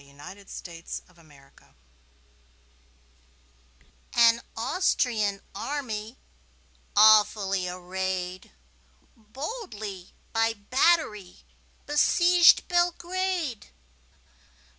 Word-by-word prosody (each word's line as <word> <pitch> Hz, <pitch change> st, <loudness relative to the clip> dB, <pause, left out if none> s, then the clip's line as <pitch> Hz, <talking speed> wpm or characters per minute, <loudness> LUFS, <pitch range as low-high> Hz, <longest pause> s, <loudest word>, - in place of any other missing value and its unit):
Y -, -, -20 dB
Z 145 Hz, +8 st, -12 dB
The 200 Hz, -, -19 dB
Siege 170 Hz, -2 st, -8 dB
of 180 Hz, -, -25 dB
Belgrade 145 Hz, -4 st, -21 dB, 2.4 s
AN 235 Hz, 0 st, +5 dB, 0.2 s
Austrian 225 Hz, -, 0 dB
army, 225 Hz, -1 st, -5 dB, 0.8 s
awfully 205 Hz, -3 st, +4 dB
arrayed, 185 Hz, 0 st, -5 dB, 0.6 s
Boldly 215 Hz, -, -8 dB, 0.2 s
by 225 Hz, 0 st, +1 dB
battery 215 Hz, -, 0 dB, 0.4 s
besieged 345 Hz, +4 st, +4 dB
Belgrade. 350 Hz, -, -1 dB
215 Hz, 65 wpm, -26 LUFS, 185-290 Hz, 2.4 s, AN